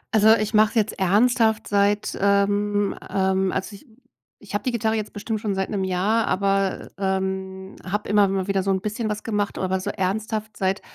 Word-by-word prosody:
Also, 220 +1 +6
ich 215 0 -2
mache 215 0 +5
es - - -14
jetzt 220 -2 0
ernsthaft 220 +3 +2
seit, 205 +1 +1
ähm, 205 0 +2
ähm 190 -1 +1
also 190 +2 -3
ich 230 +8 -16 0.6
ich 200 - -11
habe 205 +3 -2
die 255 - +1
Gitarre 220 -1 0
jetzt 215 -1 -4
bestimmt 215 +1 -3
schon 205 -2 -2
seit 190 0 -2
'nem 195 -3 -1
Jahr, 200 +5 +1
aber, 195 0 0
ähm, 190 0 -3
habe 205 +3 -4
immer 205 -1 +4
mal 190 -1 -1
wieder 195 -1 +1
so 195 +1 0
'n 190 -1 0
bisschen 215 +2 -3
was 210 0 -4
gemacht. 205 -2 -2
Aber 190 0 -1
so 185 - -4
ernsthaft 215 +3 -3
seit, 190 +1 0
200 Hz, 195 wpm, -23 LUFS, 190-215 Hz, 0.6 s, Also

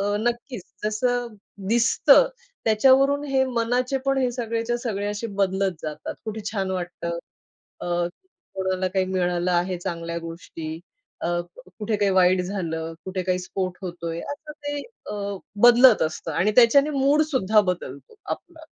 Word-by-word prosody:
अ, 205 +1 0
नक्कीच 240 -2 -2 0.2
जसं 245 +3 0 0.4
दिसतं 235 - +5 0.4
त्याच्यावरून 270 +6 +4
हे 265 -1 +3
मनाचे 250 +1 0
पण 275 0 +2
हे 255 -2 +2
सगळेच्या 230 0 -2
सगळे 205 -4 -3
असे 210 +2 -3 0.2
बदलत 190 0 +1
जातात. 155 -1 -5
कुठे 220 0 -4
छान 195 -3 -1
वाटतं. 175 -2 -4 0.6
अ, - - -4 0.7
कोणाला 190 -1 0
काही 185 0 0
मिळालं 180 -1 0
आहे 180 +1 +1
चांगल्या 170 -1 -4
गोष्टी, 165 -1 -7 0.4
अ, - - -1 0.5
कुठे 215 0 0
काही 205 -1 +2
वाईट 185 0 +4
झालं, 165 -4 -3
कुठे 185 -1 -3
काही 185 0 0
स्फोट 185 0 -4
होतोय, 170 -2 -5
असं 300 +1 -7
ते 290 -1 -5 0.3
अ, - - -4 0.5
बदलत 245 -1 +7
असतं 155 0 -3
आणि 200 +5 +2
त्याच्याने 275 +4 +6
मूडसुद्धा 275 - +3
बदलतो 180 - -5
आपला. 345 -2 -6
205 Hz, 140 wpm, -24 LUFS, 180-245 Hz, 0.7 s, बदलत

